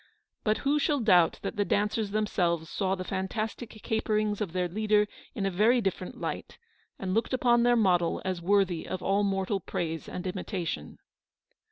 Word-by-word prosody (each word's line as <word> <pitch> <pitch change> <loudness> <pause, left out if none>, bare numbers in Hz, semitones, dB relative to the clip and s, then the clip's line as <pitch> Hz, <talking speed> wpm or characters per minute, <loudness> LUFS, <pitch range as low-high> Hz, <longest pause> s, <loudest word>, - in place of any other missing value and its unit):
But 215 -1 +2
who 290 +2 +3
shall 290 -1 +1
doubt 180 -8 +4
that - - -4
the 205 - +3
dancers 210 +1 0
themselves 175 -6 0
saw 190 -1 0
the 185 - -5
fan 190 +1 -2
tastic 220 +3 -4
caperings 215 -1 0
of 200 -6 -2
their 180 0 0
leader 210 +3 +2 0.3
in 200 - -1
a 195 - +1
very 220 +7 +4
different 195 -3 -3
light, - - -5 0.4
and 185 -1 -3
looked 225 +5 0
upon 240 -1 +3
their 240 0 +4
model 180 -6 +2
as 185 -2 -2
worthy 190 -2 +2
of 185 - -4
all 200 +1 +2
mortal 195 0 0
praise 165 -2 -4
and 180 - -6
imitation. 180 - -4
200 Hz, 175 wpm, -29 LUFS, 180-215 Hz, 0.4 s, doubt